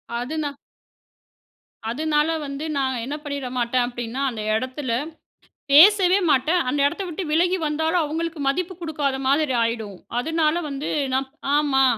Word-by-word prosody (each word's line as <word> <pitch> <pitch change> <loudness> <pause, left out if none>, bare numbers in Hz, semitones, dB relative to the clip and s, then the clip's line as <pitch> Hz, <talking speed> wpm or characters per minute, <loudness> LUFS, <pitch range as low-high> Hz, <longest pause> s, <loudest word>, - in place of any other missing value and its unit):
அது 245 +5 -3
நான் 285 -1 -4 1.3
அதுனால 300 +4 +1 0.2
வந்து 280 +2 -5
நான் 260 -3 0
என்ன 285 - -4
பண்ணிறமாட்ட 255 -4 -3
அப்டின்னா, 240 +1 -5
அந்த 220 -2 -6
எடத்துல 255 +2 -3 0.8
பேசவே 375 +4 +7
மாட்டேன், 295 +7 +3
அந்த 285 +2 0
எடத்த 340 +7 -2
விட்டு 345 +3 -4
விலகி 355 +4 +2
வந்தாலும் 320 +3 +1
அவுங்களுக்கு 325 +1 -3
மதிப்பு 355 +7 0
குடுக்காத 295 -5 -1
மாதிரி 285 +1 +2
ஆயிடும். 225 -3 -2 0.2
அதுனால 320 +4 +1
வந்து 280 +1 -4 0.2
நான் 265 +1 0 0.3
"ஆமா" 280 -3 +3
290 Hz, 130 wpm, -23 LUFS, 260-320 Hz, 1.3 s, பேசவே